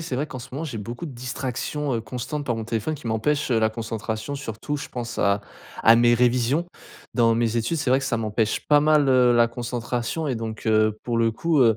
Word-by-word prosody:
C'est 160 -6 -4
vrai, 145 +3 -1
qu'en 130 - -7
ce 125 +2 -9
moment, 150 +5 -4
j'ai 130 -8 -5
beaucoup 120 - -6
de 150 - -6
distractions, 130 +3 -3
heu, 115 - -1
constantes 125 +6 -5
par 120 - 0
mon 110 - -4
téléphone 115 +6 -2
qui 135 - -9
m'empêchent, 130 +6 0
heu, 115 - +3
la 110 0 +3
concentration, 110 +2 -4
surtout, 135 +1 -4
je 150 - -7
pense 120 -1 -5
à 100 0 +2 0.4
à 115 - +8
mes 120 0 +5
révisions. 125 +6 +2 0.5
Dans 115 -2 +4
mes 115 0 +1
études, 115 +9 -1
c'est 145 -5 -1
vrai 130 - +5
que 135 - -3
ça 120 - 0
m'empêche 110 0 -1
pas 150 -1 +6
mal, 150 -1 +4
heu, 125 -2 +5
la 120 0 +5
concentration 120 +4 -3
et 130 - 0
donc, 110 -1 -5
heu, 110 -1 +3
pour 120 -1 0
le 115 0 +3
coup, 160 +7 0
heu, 115 -4 +5
120 Hz, 235 wpm, -24 LUFS, 115-140 Hz, 0.5 s, à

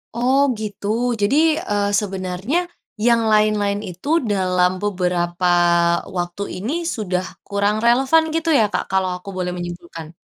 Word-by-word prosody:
Oh 255 +3 +2 0.2
gitu. 205 -1 -5 0.3
Jadi, 205 +7 +2 0.4
eee, 205 0 +1
sebenernya 190 - -3 0.5
yang 235 -1 +4
lain-lain 210 -1 +2
itu 180 +8 -11 0.2
dalam 180 -2 +2
beberapa 180 -2 -1 0.7
waktu 175 +3 -3 0.2
ini, 225 +10 -3 0.2
sudah 185 -5 -2 0.2
kurang 205 +1 0
relevan 265 +7 +4
gitu 330 0 0
ya - - +5
Kak, - - 0
kalau 190 -1 +1
aku 190 +2 -11
boleh 180 -1 -2
menyimpulkan? 170 -2 -7
200 Hz, 130 wpm, -20 LUFS, 180-215 Hz, 0.7 s, ya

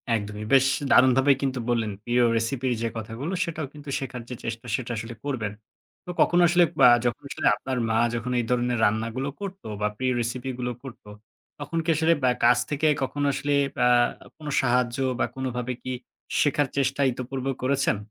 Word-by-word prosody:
একদমই। 105 0 -4
বেশ 135 -1 +6 0.3
দারুণভাবে 130 +2 +5
কিন্তু 135 -2 -1
বললেন 115 -3 0
প্রিয় 120 +2 +2 0.2
recipe 120 +3 -1
র - - +3
যে 115 - 0
কথাগুলো 115 - -5
সেটাও 155 -4 -4
কিন্তু 145 -1 -10
শেখার 130 -2 -6
যে 125 - -5
চেষ্টা 115 0 -5
সেটা 125 0 -4
আসলে 115 +2 -6
করবেন। 115 -8 -2 0.5
তো - - -10
কখনো 175 0 +4
আসলে 175 +1 +5 0.2
বা - - +9 0.2
যখন 120 - -1
আসলে - - -1
আপনার 130 +4 -4
মা 110 - +2 0.2
যখন 120 +2 -3
এই 120 - -1
ধরনের 125 -1 +1
রান্নাগুলো 115 +6 -1
করতো 195 - -7
বা 105 - +2
প্রিয় 130 +1 0
recipe 125 +3 -3
গুলো 125 0 -2
করতো, 120 -5 -11 0.5
তখন 145 +3 -4
কি 160 - -4
আসলে 160 +2 +3
অ্যা 125 -1 +3
কাছ 120 +1 +6
থেকে 150 +1 +1 0.2
কখনো 145 +2 -2
আসলে 145 +1 -1 0.2
অ্যা 125 - +3 0.5
কোন 155 - -10
সাহায্য 125 -1 +1 0.2
বা - - +3
কোনভাবে 125 -1 -3
কি 130 - -4 0.5
শেখার 145 -1 +2
চেষ্টা 135 0 +1
ইতপূর্বে 130 +2 -4
করেছেন? 135 -3 +1
125 Hz, 180 wpm, -25 LUFS, 120-140 Hz, 0.5 s, বা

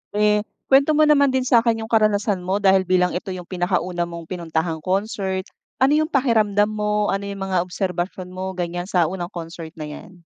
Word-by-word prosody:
Eh, 210 0 +3 0.3
kuwento 280 +3 +5
mo 310 - +5
naman 290 -2 +5
din 260 - +2
sakin 230 -2 +3
yung 220 - -9
karanasan 210 -3 +2
mo 190 +3 -2
dahil 190 -1 +4
bilang 180 -1 +3
ito 180 - -5
yung 180 - -7
pinakauna 180 -1 -1
mong 170 -1 -7
pinuntahang 165 -2 -2
concert, 190 +1 -2 0.4
ano 275 +3 +5
yung 310 - +1
pakiramdam 215 -7 +2
mo, 210 0 0
ano 195 +1 -2
yung 200 -1 -5
mga 190 -2 0
obserbasyon 180 0 -3
mo 185 0 -5
ganyan 175 0 -3
sa 180 -4 +2
unang 175 -2 -4
concert 165 -1 -8
na 155 - -7
yan? 170 +4 -10
190 Hz, 185 wpm, -22 LUFS, 180-210 Hz, 0.4 s, kuwento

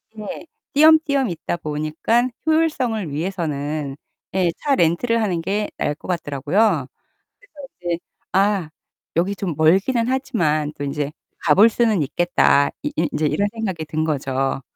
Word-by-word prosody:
네. 215 +9 -7 0.3
띄엄띄엄 290 -4 +5
있다 170 0 -3
보니까 155 +12 0 0.2
효율성을 265 - +1
위해서는 150 -4 -3 0.4
예, 180 -3 +2
차 285 -2 0
렌트를 230 +6 +2
하는 180 -6 0
게 205 +5 -1
나을 150 - 0
것 - - -13
같더라고요. 165 - +1 0.5
그래서 - - -25 0.3
이제 175 -1 -2 0.3
'아, 195 -4 +2 0.5
여기 185 +4 +1
좀 180 -5 -3
멀기는 195 +10 +3
하지만 175 - 0
또 145 - -3
인제 145 +1 -3 0.3
가 155 - +4
볼 215 +3 +7
수는 220 -7 +2
있겠다.' 145 -2 +3
이 295 - -1
이 - - +2
인제 150 +1 0
이런 200 +7 +1
생각이 190 -8 -3
든 155 +1 -2
거죠. 135 -3 -1
175 Hz, 290 characters per minute, -21 LUFS, 150-225 Hz, 0.5 s, 볼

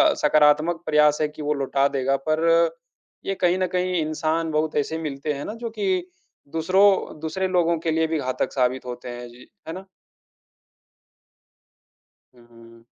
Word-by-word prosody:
सकारात्मक 150 +3 +3
प्रयास 150 -1 +4
है 155 - +2
कि 150 +1 -11
वो 150 0 0
लौटा 140 -1 +1
देगा, 135 0 +1
पर 155 +1 +1 0.8
ये 195 - -1
कहीं 180 0 +3
न 185 - +1
कहीं 180 0 0
इंसान 155 +1 -1
बहुत 155 0 -1
ऐसे 150 +2 -1
मिलते 150 -1 -3
हैं 140 0 -6
ना - - -5
जो - - -2
कि 375 -3 +1 0.5
दूसरों 190 +1 +2
दूसरे 175 +4 -2
लोगों 170 -2 +2
के 165 0 -1
लिए 160 0 +1
भी 160 -1 -1
घातक 130 -2 -2
साबित 130 0 0
होते 125 0 -7
हैं। 120 0 -7
जी, 120 +1 -16 0.2
है 160 - -4
ना? 190 +2 -8 2.5
हुँ, 120 -1 -20
हुँ। 115 0 -18
155 Hz, 160 wpm, -23 LUFS, 135-165 Hz, 2.5 s, प्रयास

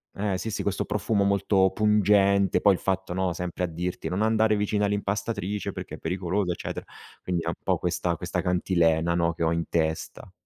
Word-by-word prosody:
eh, 100 -1 -1
sì, 110 - -4
sì, 105 - -3
questo 100 -1 -1
profumo 105 0 0
molto 100 -1 +3
pungente. 100 -2 +3
Poi 100 - +6
il 95 - -3
fatto, 95 -2 -2
no, 95 -1 0
sempre 90 +1 -3
a - - -4
dirti: 85 0 -4
“Non 90 +5 -1
andare 110 0 +3
vicino 105 0 0
all'impastatrice 105 0 -2
perché - - -7
è - - -12
pericoloso”, 90 +2 -1
eccetera, - - -6 0.4
quindi 90 -2 -2
è - - -6
un - - -1
po' - - +1
questa 90 -1 -1
questa - - -3
cantilena, 85 -2 +2
no, 85 -1 +1
che 85 - -3
ho 80 - +2
in 85 0 -1
testa. 80 +3 -2
95 Hz, 195 wpm, -26 LUFS, 85-105 Hz, 0.4 s, Poi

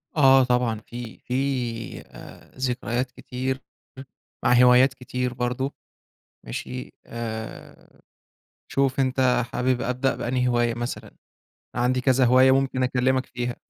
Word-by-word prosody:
آه، 135 -3 +6
طبعًا 125 -3 +1
في 120 -2 -8
في 125 - -7 0.7
آآ، - - -14
ذكريات 125 -1 -2
كتير 130 +2 -4 0.8
مع - - +4
هوايات 125 +2 +6
كتير 125 -1 -3
برضه، 125 +2 -2 0.7
ماشي 125 - -6
آآ، 110 -1 -8 0.7
شوف 135 -1 0
أنت 130 -2 +2
حابب 125 0 +1
أبدأ 125 +2 0
بأنهي 125 +1 -1
هواية 120 -1 +2
مثلًا؟ 120 +1 -5 0.6
عندي 125 +1 +1
كذا 130 0 +3
هواية 130 +2 +6
ممكن 135 -1 +1
أكلمك 130 +1 +1
فيها. 120 0 -4
125 Hz, 115 wpm, -24 LUFS, 120-130 Hz, 0.8 s, آه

